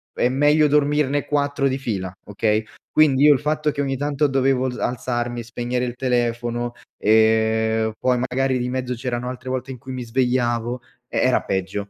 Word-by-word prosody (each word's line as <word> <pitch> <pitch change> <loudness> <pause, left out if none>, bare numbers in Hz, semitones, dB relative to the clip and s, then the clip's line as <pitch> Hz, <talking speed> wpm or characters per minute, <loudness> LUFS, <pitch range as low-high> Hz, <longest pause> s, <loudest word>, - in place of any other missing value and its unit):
è 120 - +2
meglio 150 +3 +4
dormirne 145 -1 +2
4 145 -1 0
di 130 - -1
fila, 100 -8 -3 0.2
okay, 105 +1 0 0.3
quindi 145 -3 +4
io 150 - +8
il 135 - -1
fatto 150 0 0
che 140 0 -3
ogni 135 -1 -1
tanto 145 +1 +1
dovevo 135 -1 +1
alz 125 - -4
alzarmi, 120 -1 -2
spegnere 120 +2 -3
il 120 0 -5
telefono, 120 -1 -1 0.3
ehm, 110 0 +3
poi 125 -1 +2
magari 130 +1 0
di 125 0 -2
mezzo 125 -1 -2
c’erano 120 0 -3
altre 130 0 -7
volte 130 +1 -3
in 130 - -7
cui 130 +2 -9
mi 125 - -4
svegliavo, 120 0 0 0.3
eh, - - -1
era - - +3
peggio. 95 +2 -3
125 Hz, 175 wpm, -22 LUFS, 120-135 Hz, 0.3 s, io